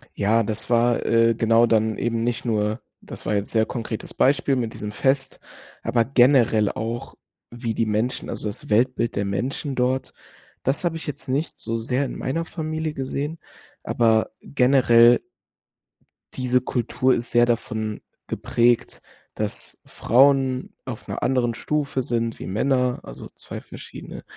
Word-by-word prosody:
Ja, 110 +3 +2
das 110 +1 -4
war, 120 0 +3
äh, 115 0 +4
genau 115 +1 +4
dann 110 -1 +2
eben 115 -1 -1
nicht 120 +1 -2
nur 110 -1 0 0.2
das - - -9
war 105 - 0
jetzt 100 0 -1
sehr 110 -1 +3
konkretes 115 -1 -5
Beispiel 140 0 +2
mit 115 -3 -2
diesem 105 0 -6
Fest, 135 +3 0 0.4
aber 115 -2 +2
generell 120 -4 +4
auch, 115 +2 -5 0.4
wie 120 -1 -3
die 115 0 0
Menschen, 110 +4 -1
also - - -4
das 110 +7 -6
Weltbild 120 +1 +1
der 100 - 0
Menschen 125 +8 -2
dort, 130 +1 0 0.5
das 135 +6 -1
habe 170 -2 0
ich 165 - -6
jetzt 150 - -5
nicht 140 +5 -2
so 115 +1 -2
sehr 125 +4 0
in - - -6
meiner 165 +6 -2
Familie 160 -1 -3
gesehen, 145 +3 -4 0.4
aber 110 -2 +2
generell 120 -3 +5 1.1
Diese 125 -1 +1
Kultur 125 +1 0
ist 115 0 -3
sehr 120 0 +5
davon 110 -2 -2 0.3
geprägt, 120 0 +1 0.3
dass 105 -1 -4
Frauen 130 +1 +2
auf 125 -4 -8
'ner - - -4
anderen 125 -2 +1
Stufe 140 +2 -1
sind 115 -2 -2
wie - - -7
Männer, 125 +5 +1
also - - -9
zwei - - -8
verschiedene. - - -10
120 Hz, 150 wpm, -23 LUFS, 115-130 Hz, 1.1 s, generell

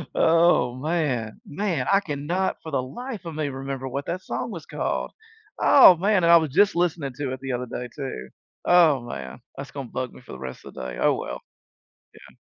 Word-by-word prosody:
Oh, 165 -6 +4
man. 130 -7 -2
Man, 165 -4 -2
I 195 - +6
cannot 170 +2 -2
for 160 - -7
the 135 - +1
life 230 - -7
of 165 -2 -6
me 150 -2 -1
remember 135 0 -5
what 140 +2 -4
that 185 +2 -3
song - - -4
was 170 -5 -8
called. - - -3 0.5
Oh, 225 -10 +8
man. 195 +1 +2
And 170 - +5
I - - +10
was 160 -3 0
just 200 +6 +3
listening 165 -6 0
to 135 -3 -2
it 130 - -6
the 135 -1 -5
other 125 0 -3
day 125 +1 -5
too. 100 - -6 0.4
Oh, 165 -7 +5
man. 120 - -7 0.2
That's 140 -1 -7
gonna 135 -4 -7
bug 130 -1 -4
me - - -14
for - - -14
the 65 - -8
rest 65 -1 -8
of - - -10
the - - -7
day. - - -7
Oh, - - +4
well. - - -5 0.8
Yeah. - - -16
145 Hz, 210 wpm, -24 LUFS, 130-175 Hz, 0.8 s, I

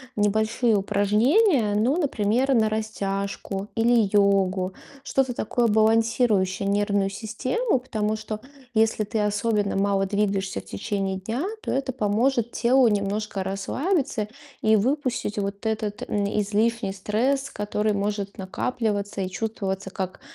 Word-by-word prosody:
небольшие 220 +3 +2
упражнения. 210 - +3
Ну, 245 +10 +2
например, 260 - +1
на 220 -1 +4
растяжку 200 -1 -4
или 230 -2 +3
йогу. 195 -2 +2 0.3
Что-то 265 -2 0
такое, 235 +1 0
балансирующее 220 -3 +2
нервную 200 -1 +1
систему. 245 - -1
Потому 215 -4 -2
что, 215 0 -5 0.3
если 220 -1 +2
ты 215 +1 -2
особенно 210 0 0
мало 195 0 +2
двигаешься 195 - -1
в - - -25
течение 190 - -3
дня, 230 - -3 0.2
то - - -3
это 270 0 -1
поможет 235 +1 +1
телу 250 +1 +4
немножко 205 -1 -1
расслабиться 245 - -1 0.3
и 220 0 +4
выпустить 255 -2 -1
вот 200 +2 -4
этот, 215 -2 -2
м, 205 -1 0 0.2
излишний 215 0 0
стресс, 255 +8 0
который 210 +1 -1
может 200 0 -2
накапливаться 205 0 -2
и 185 - -2
чувствоваться 195 -1 -3
как, 190 -1 -5
210 Hz, 125 wpm, -25 LUFS, 200-235 Hz, 0.3 s, на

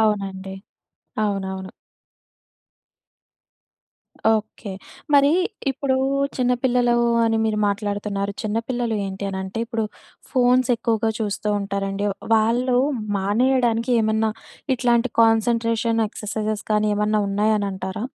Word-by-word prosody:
అవునండి. 195 -3 -1 0.7
అవునవును. 190 -2 -3 2.7
ఓకే. 215 -1 -7 0.4
మరీ 280 +1 +6 0.4
ఇప్పుడు 265 0 0 0.4
చిన్నపిల్లలు 245 -1 +2 0.3
అని 225 0 +2
మీరు 215 -1 0
మాట్లాడుతున్నారు. 205 -1 -2
చిన్న 215 +1 -2
పిల్లలు 240 -3 -1
ఏంటి 195 +1 -5
అనంటే, 190 +2 -5
ఇప్పుడు 225 -2 -2 0.5
ఫోన్స్ 255 -1 +3
ఎక్కువగా 225 -1 0
చూస్తూ 210 0 -2
ఉంటారండి. 200 0 -2 0.3
వాళ్ళు 240 +3 +2 0.4
మానేయడానికి 235 +3 +1
ఏమన్నా 220 0 +1 0.4
ఇట్లాంటి 240 0 +2
కాన్సంట్రేషన్ 230 0 +2
ఎక్ససైజ్స్ 215 0 -4
కానీ 210 0 +2
ఏమన్నా 210 +1 +1
ఉన్నాయని 205 0 +1
అంటారా? 190 +4 -5
220 Hz, 90 wpm, -22 LUFS, 205-240 Hz, 2.7 s, మరీ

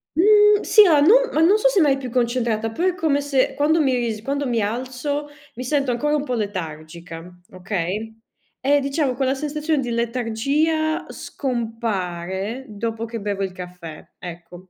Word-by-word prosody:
Mhmm, 420 +4 +5
sì 425 -2 +7
a 305 -4 +5
non 480 +11 +5
ma 310 - +1
non 370 +6 +5
so - - +4
se 425 - +2
mai 280 -3 +3
più 260 -2 -6
concentrata, 235 -2 0
però 345 +11 0
è 365 - 0
come 305 -5 +1
se 280 -2 +1
quando 310 +3 +2
mi 265 -3 +2
ris 230 -3 -2
quando 280 +2 -2
mi 235 -2 0
alzo, 255 +7 -3 0.3
mi 255 - -5
sento 275 0 0
ancora 295 +5 0
un 295 - -1
po' 255 - -3
letargica, 170 -4 -6 0.2
okay, 195 +4 -4 0.4
e 285 +2 +3
diciamo, 275 -1 0
quella 265 +1 0
sensazione 300 +1 -1
di 245 - -4
letargia 255 +7 0
scompare, 220 - -4
dopo 225 +2 -4
che 230 0 -6
bevo 200 -1 -2
il 190 - -3
caffè, 180 -3 -10
ecco. 175 +1 -10
245 Hz, 165 wpm, -22 LUFS, 205-290 Hz, 0.4 s, sì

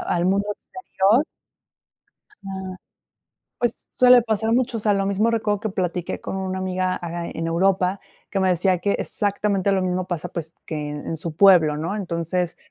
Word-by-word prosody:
al 175 0 +1
mundo 195 +2 +2
exterior 235 - 0 1.2
ajá, 190 -1 -6 0.8
pues, 240 -2 -2
suele 250 -1 +8
pasar 220 -1 -1
a - - +3
muchos. 240 -1 +1
O - - -11
sea, 210 - +3
lo 195 0 0
mismo 200 +4 +1
recuerdo 210 -3 0
que 220 - -3
platiqué 180 -2 -3
con - - -5
una 190 0 -3
amiga, 185 0 -1
aca 170 -1 -5
en 165 0 -4
Europa, 185 +2 +1 0.3
que 195 - -1
me 190 -1 +2
decía 180 +1 +2
que 200 +3 0
exactamente 200 -1 0
lo 195 -1 +2
mismo 185 0 -1
pasa, 175 -1 -3
pues, 165 -1 -6
que 150 -2 -4
en 150 +2 -5
su 155 0 -5
pueblo, 175 -6 +6
¿no? 165 +6 -3
Entonces, 175 -2 -2
190 Hz, 175 wpm, -23 LUFS, 175-205 Hz, 1.2 s, suele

